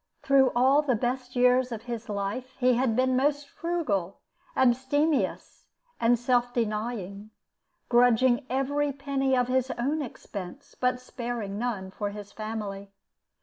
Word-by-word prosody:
Through 275 -2 +4
all 265 +4 +5
the 270 -5 +1
best 250 +2 -3
years 250 0 +4
of 225 -1 -5
his 235 -2 -6
life 210 +6 -4
he 255 -1 +3
had 245 -2 +1
been 255 +1 +2
most 285 +2 +1
frugal, 250 - -2 0.4
abstemious, 260 -1 +1 0.3
and 235 +1 +4
self 245 0 +1
denying, 215 -3 -3 0.6
grudging 245 +1 +4
every 285 +3 0
penny 270 -1 0
of 250 -1 +2
his 260 0 +1
own 285 +6 0
expense, 225 -2 -8
but 250 0 0
sparing 235 -5 -5
none 210 -6 -3
for 205 +1 -3
his 205 0 -9
family. 210 -3 -5
245 Hz, 135 wpm, -27 LUFS, 220-260 Hz, 0.6 s, all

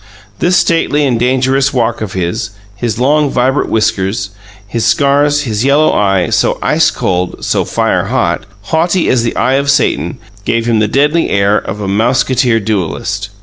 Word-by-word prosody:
This 180 +1 +2
stately 150 -3 +1
and 125 -4 0
dangerous 130 +2 +1
walk 120 -4 -1
of 105 -3 -4
his, 95 +5 -3 0.3
his 110 0 -3
long, 145 +3 +2
vibrant 130 +2 0
whiskers, 100 -3 -1 0.3
his 110 +3 -3
scars, 145 +1 +2
his 110 -4 -2
yellow 145 +3 +3
eye, 95 -4 +1
so - - +1
ice - - +2
cold, 90 -1 -2
so - - +1
fire - - 0
hot, - - -1 0.2
haughty 165 - 0
as 125 - +2
the 115 - -2
eye 130 +3 +1
of 140 - -3
Satan, 140 0 +1 0.3
gave 115 +2 -1
him 115 -2 +1
the 110 - +2
deadly 150 +8 +1
air 100 +1 +2
of 105 0 -3
a 100 - -3
mousquetaire 120 +3 +1
duellist. 100 -1 -3
120 Hz, 165 wpm, -13 LUFS, 105-140 Hz, 0.3 s, yellow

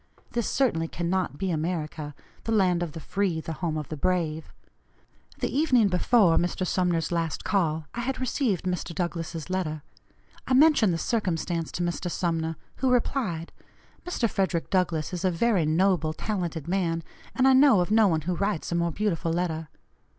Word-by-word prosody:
This, 235 -2 -1
certainly, 165 -12 +1
cannot 175 -2 -2
be 190 +2 -1
America, 155 -2 -3 0.3
'the 225 - -1
land 185 -5 +3
of 170 -4 -3
the 165 - -6
free,' 185 +1 -1
the 160 0 -5
'home 160 -1 -2
of 150 - -5
the 155 - -4
brave.' 160 -1 -1 0.9
The - - -1
evening 255 -8 +4
before 185 -1 +4
Mr. 175 +1 0
Sumner's 175 -3 0
last 165 -3 -1
call 160 -5 0
I - - -5
had 255 +2 -2
received 250 - 0
Mr. 180 -2 -3
Douglass's 165 -3 -3
letter; 165 -5 -2 0.6
I 260 - +3
mentioned 280 - +5
the 165 - 0
circumstance 170 -4 -1
to 175 - -2
Mr. 175 +1 -2
Sumner, 165 -2 -1 0.2
who 265 - +1
replied: 230 - 0 0.5
'Mr. 350 -9 0
Frederick 190 -5 -1
Douglass 175 -3 0
is 180 - -3
a 185 - +3
very 180 -1 +2
noble, 160 -1 +2
talented 170 -5 -3
man, 170 -3 0 0.3
and 260 0 +4
I 265 - +6
know 265 -5 +6
of 180 +3 0
no 220 -1 +5
one 160 -4 +1
who 175 +4 -2
writes 200 -3 -2
a - - 0
more 170 0 +1
beautiful 170 -3 -1
letter.' 165 -2 -2
175 Hz, 170 wpm, -26 LUFS, 165-205 Hz, 0.9 s, I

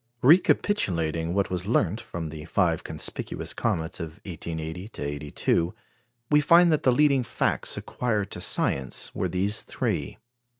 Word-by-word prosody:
Recapitulating 90 - +3
what 100 -2 0
was 90 +1 -2
learnt 105 -2 +1
from 80 -2 -6
the 75 -1 -8
five - - +1
conspicuous - - -4
comets 80 0 -2
of 80 +2 -7
1880 85 +1 -5
82, 75 +5 -1 0.6
we 150 0 +6
find 170 +3 +6
that 155 - +2
the 130 - +4
leading 140 0 +4
facts 120 - -1
acquired 110 -5 -2
to - - -5
science 65 -2 0
were - - -1
these 100 +4 0
three. - - -3
90 Hz, 135 wpm, -26 LUFS, 80-125 Hz, 0.6 s, we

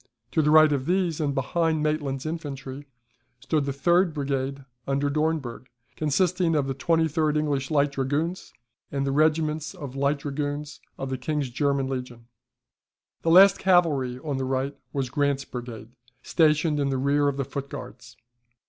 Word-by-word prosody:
To 160 - +2
the 150 - +2
right 155 0 +7
of 140 -2 -1
these, 175 -3 +1
and 140 -2 -1
behind 160 +3 0
Maitland's 145 -3 -1
infantry, 145 -3 -6 0.5
stood 150 +3 0
the 140 - -1
third 170 +4 +2
brigade 135 -1 -2 0.2
under 140 +1 0
Dornberg, 150 -5 -2 0.3
consisting 165 +2 +1
of 145 -2 +2
the 135 - -2
23d 160 0 +1
English 145 -3 -1
Light 145 -2 +2
Dragoons, 145 +6 -2 0.4
and 140 -1 -1
the 135 - 0
regiments 155 +1 +1
of 135 -3 -8
Light 140 +1 +1
Dragoons 145 +1 -4 0.2
of 135 0 -5
the 130 - -3
King's 145 -1 -2
German 140 +1 0
Legion. 125 -3 -6 1.0
The 165 - 0
last 190 +3 +7
cavalry 155 -9 +2
on 140 0 -4
the 130 - -2
right 135 +2 -1 0.2
was 135 -3 -2
Grant's 140 -1 0
brigade, 120 -3 -8 0.3
stationed 155 -1 +2
in 140 -1 +1
the 135 - 0
rear 140 +2 +2
of 140 -1 -1
the 135 - -1
Foot 140 0 -6
Guards. 120 0 -10
145 Hz, 160 wpm, -25 LUFS, 135-155 Hz, 1.0 s, right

